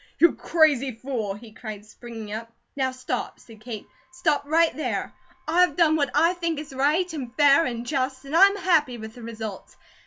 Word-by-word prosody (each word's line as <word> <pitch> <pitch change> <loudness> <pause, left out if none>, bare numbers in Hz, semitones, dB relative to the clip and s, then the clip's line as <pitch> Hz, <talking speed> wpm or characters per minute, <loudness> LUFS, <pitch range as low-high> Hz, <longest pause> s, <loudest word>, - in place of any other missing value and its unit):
"You 340 - +5
crazy 290 -6 +2
fool!" 225 -4 -4
he 220 +1 -13
cried, 215 -3 -8
springing 220 -1 -9
up. 230 +1 -6 0.2
"Now 265 -2 +1
stop," 255 -1 -4
said 220 -2 -16
Kate. 220 -2 -7 0.3
"Stop 330 -5 0
right 325 +2 +3
there! 310 - -3 0.3
I've 345 -1 +3
done 320 -3 +4
what 285 -3 +1
I 330 +4 +4
think 335 -3 -2
is 295 -2 -7
right, 305 +7 +1
and 255 -5 -6
fair, 290 +2 +5
and 240 -1 -4
just, 260 0 -2
and 280 +3 -4
I'm 395 +3 +7
happy 320 -10 +2
with 220 -1 -8
the 245 - -12
results. 220 -3 -7
270 Hz, 185 wpm, -25 LUFS, 230-315 Hz, 0.3 s, I'm